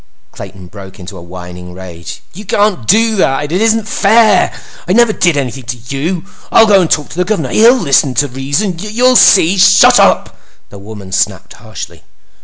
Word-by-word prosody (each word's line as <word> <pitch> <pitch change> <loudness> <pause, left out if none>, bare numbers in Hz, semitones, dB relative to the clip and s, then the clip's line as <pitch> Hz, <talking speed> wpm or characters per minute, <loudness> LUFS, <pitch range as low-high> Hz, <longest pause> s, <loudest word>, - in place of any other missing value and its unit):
Clayton 95 -2 -12
broke 95 +1 -13
into 95 +2 -11
a 85 - -11
whining 90 0 -11
rage. 90 -3 -11
"You 200 +5 -11
can't 205 - -1
do 220 +2 +2
that! 145 -3 -1
It 180 +4 -1
isn't 225 -1 0
fair! 215 -1 +2 0.4
I 180 - 0
never 235 0 +2
did 175 -7 0
anything 130 -2 -5
to 125 +1 -6 0.2
you! 165 +6 -4 0.3
I'll 225 - +5
go 200 -3 +3
talk 150 -2 -2
to - - -11
the 180 - +1
Governor! 205 +2 -3
He'll 235 +4 +4
listen 140 - 0
to 145 +5 0
reason! 140 +10 -3
You'll 235 +6 0
see! 180 -7 +5
I'll—" 195 - -2
"Shut 195 +1 +5
up!" - - +1 0.4
the 100 - -12
woman 100 -1 -12
snapped - - -3
harshly. - - -11
160 Hz, 185 wpm, -12 LUFS, -, 0.4 s, I'll